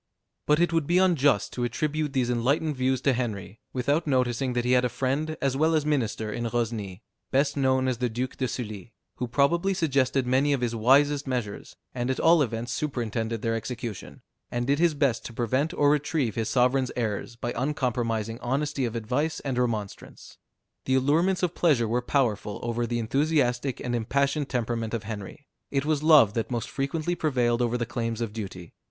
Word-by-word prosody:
But 150 +1 +4
it 175 0 +2
would 165 -3 +1
be 175 - +3
unjust 145 - +3
to 125 - -3
attribute 150 +4 -1
these 125 -3 +1
enlightened 140 +6 +1
views 130 0 0
to 135 - +3
Henry, 110 -4 -4
without 145 +6 0
noticing 130 -1 +1
that 120 0 -1
he 125 - +1
had 125 0 +4
a 125 - +1
friend 145 +6 -2
as 135 -1 0
well 160 +3 +2
as 155 -2 +1
minister 115 -7 -1
in 120 - -3
Rosny, 110 -4 -3 0.3
best 140 +1 +1
known 130 -2 +2
as 125 -2 -1
the 125 -1 0
Duke 125 +3 -3
de 130 - -1
Sully, 110 -2 -6 0.2
who 125 - -2
probably 170 +10 +2
suggested 135 -6 +1
many 135 +3 +2
of 135 - -1
his 120 -1 -1
wisest 140 +5 +3
measures, 120 -6 -4 0.2
and 125 0 -2
at 130 - -1
all 165 0 +5
events 120 -1 -2
superintended 115 -5 -2
their 115 -1 +1
execution, 110 - -6 0.3
and 120 0 -2
did 140 +3 +1
his 170 -2 +3
best 140 -5 +1
to 120 - -7
prevent 130 +7 0
or 145 -5 +3
retrieve 150 -5 0
his 110 -1 -2
sovereign's 125 +2 +2
errors 115 -1 -3
by 120 +1 -4
uncompromising 120 -4 -1
honesty 135 +1 -1
of 115 -1 -4
advice 130 +8 -1
and 130 -3 -2
remonstrance. 110 -5 -4 0.5
The 130 - +2
allurements 165 +8 +2
of 175 -2 +1
pleasure 140 -10 +2
were 120 +3 0
powerful 115 -6 0
over 120 0 -1
the 120 +1 -1
enthusiastic 130 +1 0
and 120 - -3
impassioned 140 +5 0
temperament 115 -2 -2
of 115 - -4
Henry; 110 +7 -7 0.2
it 140 0 -1
was 155 -2 +1
love 150 -9 +6
that 115 -1 -2
most 120 -2 -3
frequently 155 +5 -2
prevailed 125 -8 +1
over 120 0 +1
the 120 - -2
claims 115 -1 -3
of 115 -3 -3
duty. 95 -6 -7
125 Hz, 190 wpm, -26 LUFS, 115-145 Hz, 0.5 s, love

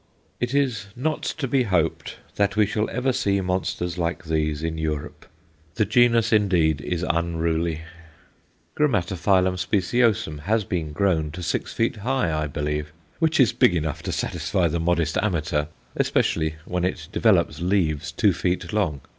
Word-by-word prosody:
It 120 +2 -1
is 125 -8 0
not 150 +5 -1
to 145 -4 -3
be 130 +1 +2
hoped 90 -8 0 0.2
that 100 0 +1
we 105 0 +4
shall 105 +1 -1
ever 125 +2 0
see 100 -6 +1
monsters 90 -1 -2
like 85 +1 -2
these 75 -1 -1
in 80 -1 -2
Europe. 75 -2 -4 0.5
The 110 - +2
genus, 115 +1 +3
indeed, 85 -8 +3
is 90 +4 -2
unruly. 85 -1 0 0.9
G. 150 - +3 0.7
speciosum 100 -1 +1
has 105 +8 0
been 85 -5 -3
grown 80 -2 +1
to 90 +1 -6
six - - -2
feet 115 0 0
high, 120 -5 0
I 75 0 -1
believe, 75 +1 -3 0.3
which 160 -1 +2
is 125 -7 +5
big 90 - +4
enough 80 -3 -2
to - - -4
satisfy 90 -3 0
the 85 +1 -1
modest 85 -1 +1
amateur, 80 -6 0 0.3
especially 80 -1 +1
when 90 0 -2
it 90 -4 -2
develops 95 -8 +2
leaves 80 -5 0
two 100 +3 +3
feet 90 +4 -2
long. 85 -10 0
90 Hz, 155 wpm, -24 LUFS, 80-110 Hz, 0.9 s, is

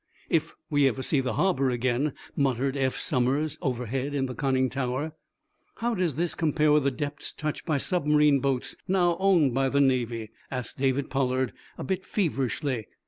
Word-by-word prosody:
"If - - +1 0.2
we 145 -2 +4
ever 130 +1 -1
see 145 - +2
the 130 -1 -1
harbor 155 -8 +2
again," 125 +3 0 0.2
muttered 135 0 +1
Eph 130 -2 0
Somers, 135 +5 0
overhead 130 +2 -2
in 135 -1 +1
the 125 - -4
conning 130 0 +1
tower. 130 +4 -2 0.6
"How 235 +1 -1
does 180 - 0
this 170 +2 0
compare 155 -1 +2
with 150 -2 +4
the - - +5
depths 145 +2 -5
touched 150 +3 -4
by 155 -3 +2
submarine 150 -3 +3
boats 135 -2 -1
now 180 -2 +3
owned 175 -9 +4
by 135 +1 +2
the 140 - +1
Navy?" 120 -5 +1 0.2
asked 125 -1 -5
David 135 0 0
Pollard, 130 -2 0 0.2
a - - -5
bit 190 -1 -2
feverishly. 135 - -1
135 Hz, 170 wpm, -27 LUFS, 130-150 Hz, 0.6 s, the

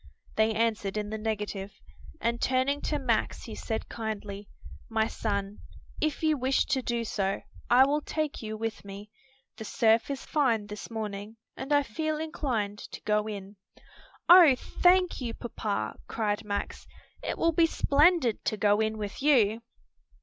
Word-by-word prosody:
They 220 +1 +3
answered 215 -3 0
in 210 0 -3
the 220 - -2
negative, 210 -2 -3 0.5
and 235 +1 -1
turning 260 +3 +1
to 300 - 0
Max 250 -5 -1
he 225 - -8
said 220 0 -4
kindly, 210 -3 -5 0.4
"My 220 -1 +2
son, 200 -2 -3 0.4
if 310 0 -1
you 310 -2 +2
wish 260 +2 +2
to 270 -3 0
do 235 -1 -2
so, 195 -2 -1 0.3
I 250 +2 +7
will 295 +2 +1
take 310 -1 -3
you 215 -1 -5
with 225 0 -4
me. 200 +1 -10 0.5
The 220 - -6
surf 225 +2 +2
is 275 -1 -4
fine 245 -9 +1
this 210 0 -8
morning 215 -1 -5 0.2
and 270 - -6
I 290 0 +5
feel 310 +6 -2
inclined 250 -10 -2
to - - -9
go 210 0 +1
in." 200 -1 -7 0.7
"Oh, 345 -6 +9
thank 360 +3 +2
you, 235 -2 -3
papa!" 110 - -4
cried 210 -2 -1
Max, 205 -1 -4 0.3
"it - - -3
will 335 - +3
be 330 +1 +4
splendid 295 - +3
to 215 - 0
go 205 0 +3
in 220 0 0
with 205 +1 -5
you!" 235 -7 +4
225 Hz, 160 wpm, -28 LUFS, 210-275 Hz, 0.7 s, Oh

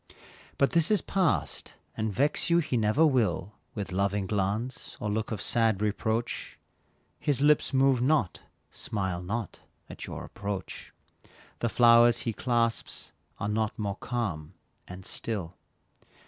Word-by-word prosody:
But 140 - +3
this 170 -1 +4
is 210 -2 +4
past, 185 -5 0 0.2
and 110 -1 -1
vex 145 - +1
you 170 - +5
he 155 -6 0
never 115 +7 +3
will, 115 - +1 0.2
With 100 -2 -4
loving 100 +1 0
glance, 105 +5 -2
or 105 -5 -2
look 110 +2 -2
of 110 - -3
sad 115 -4 +2
reproach; 110 +2 -2 0.6
His 140 -2 0
lips 150 -2 +4
move 135 -2 +3
not, 130 -8 +2 0.3
smile 95 -4 -3
not 105 +5 -4 0.3
at - - -8
your - - -6
approach; 100 -2 -6 0.7
The 120 - 0
flowers 120 0 +6
he 115 - -2
clasps 115 0 -1 0.3
are - - -2
not 110 0 -1
more 100 -2 -3
calm 95 -9 -4 0.3
and 90 +1 -9
still. 95 -7 -3
110 Hz, 135 wpm, -28 LUFS, 100-130 Hz, 0.7 s, flowers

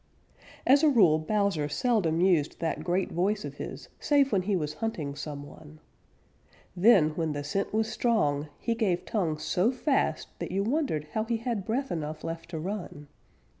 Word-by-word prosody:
As 275 +2 +6
a 310 - +5
rule, 185 - +5
Bowser 185 -3 0
seldom 185 - +1
used 175 -6 +2
that 165 -1 -2
great 180 +2 0
voice 200 +5 0
of - - -8
his - - -7
save 280 -2 +3
when 195 - +2
he 200 +2 0
was 150 -4 -2
hunting 165 -11 -2
some 145 0 -6
one. 155 +1 -14 1.0
Then, 185 -4 +6
when 160 -1 -2
the 145 0 -4
scent 195 +7 -2
was 220 +1 +1
strong, 155 - +1
he 235 - -1
gave 205 -7 0
tongue 170 -8 -1
so 180 +8 +1
fast 265 +2 0
that - - -4
you 195 +2 0
wondered 220 - -1
how 220 +5 -1
he 230 0 0
had 230 -4 -3
breath 265 +5 -1
enough 155 -2 -4
left 165 0 -5
to 170 - -5
run. 175 -4 -6
185 Hz, 175 wpm, -28 LUFS, 155-225 Hz, 1.0 s, As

